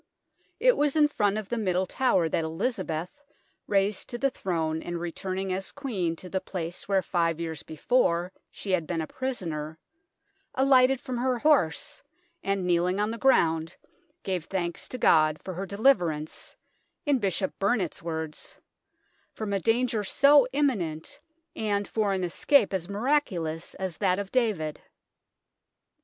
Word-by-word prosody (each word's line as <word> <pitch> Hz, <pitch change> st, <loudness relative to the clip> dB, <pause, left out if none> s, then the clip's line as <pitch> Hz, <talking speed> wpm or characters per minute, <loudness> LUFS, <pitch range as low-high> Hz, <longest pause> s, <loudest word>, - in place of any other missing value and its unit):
It -, -, +5 dB
was 290 Hz, 0 st, +2 dB
in 300 Hz, -1 st, +5 dB
front 210 Hz, -8 st, 0 dB
of 215 Hz, -3 st, -4 dB
the 235 Hz, -, -1 dB
Middle 185 Hz, -3 st, +1 dB
Tower 185 Hz, -6 st, +2 dB
that 160 Hz, -, 0 dB
Elizabeth, 180 Hz, -, -3 dB, 0.5 s
raised 200 Hz, 0 st, +1 dB
to 240 Hz, -, -4 dB
the 275 Hz, +2 st, +1 dB
throne 160 Hz, -7 st, -2 dB
and 175 Hz, 0 st, -4 dB
returning 185 Hz, +2 st, -3 dB
as 190 Hz, +1 st, -4 dB
Queen 205 Hz, -, -2 dB
to 180 Hz, -, -10 dB
the 190 Hz, +1 st, -2 dB
place 175 Hz, -2 st, -6 dB
where 195 Hz, -2 st, +2 dB
five 165 Hz, -2 st, 0 dB
years 160 Hz, -2 st, -4 dB
before 175 Hz, -, +1 dB, 0.2 s
she 195 Hz, -, -6 dB
had 170 Hz, -4 st, +1 dB
been 170 Hz, -2 st, -1 dB
a -, -, -2 dB
prisoner, 160 Hz, -, -4 dB, 0.8 s
alighted 265 Hz, -1 st, +5 dB
from 255 Hz, -3 st, -4 dB
her 255 Hz, 0 st, +1 dB
horse, 290 Hz, -, +1 dB, 0.4 s
and 195 Hz, -2 st, -1 dB
kneeling 180 Hz, +2 st, +2 dB
on 210 Hz, +1 st, +1 dB
the 230 Hz, -, -6 dB
ground, 165 Hz, -, +2 dB, 0.5 s
gave 185 Hz, -4 st, -2 dB
thanks 175 Hz, -2 st, -3 dB
to 255 Hz, -, -5 dB
God 155 Hz, -8 st, +4 dB
for 185 Hz, -, -5 dB
her 190 Hz, +3 st, -5 dB
deliver 200 Hz, -3 st, +3 dB
ance, 155 Hz, 0 st, -7 dB, 0.5 s
in 285 Hz, -3 st, +3 dB
Bishop 195 Hz, -2 st, -2 dB
Burnet's 200 Hz, -4 st, 0 dB
words, 160 Hz, -2 st, -5 dB, 0.4 s
" -, -, -41 dB
from 215 Hz, -2 st, -3 dB
a 195 Hz, -, +1 dB
danger 225 Hz, +2 st, +1 dB
so 280 Hz, +5 st, +5 dB
imminent, 260 Hz, -, -1 dB, 0.4 s
and 205 Hz, -2 st, -1 dB
for 215 Hz, -3 st, 0 dB
an 190 Hz, -1 st, -1 dB
escape 200 Hz, -, +3 dB
as 185 Hz, -1 st, -2 dB
miraculous 200 Hz, -, -1 dB
as 185 Hz, -4 st, -4 dB
that 185 Hz, -3 st, +2 dB
of 200 Hz, -1 st, -4 dB
David." 205 Hz, -12 st, 0 dB
190 Hz, 155 wpm, -27 LUFS, 170-245 Hz, 0.8 s, It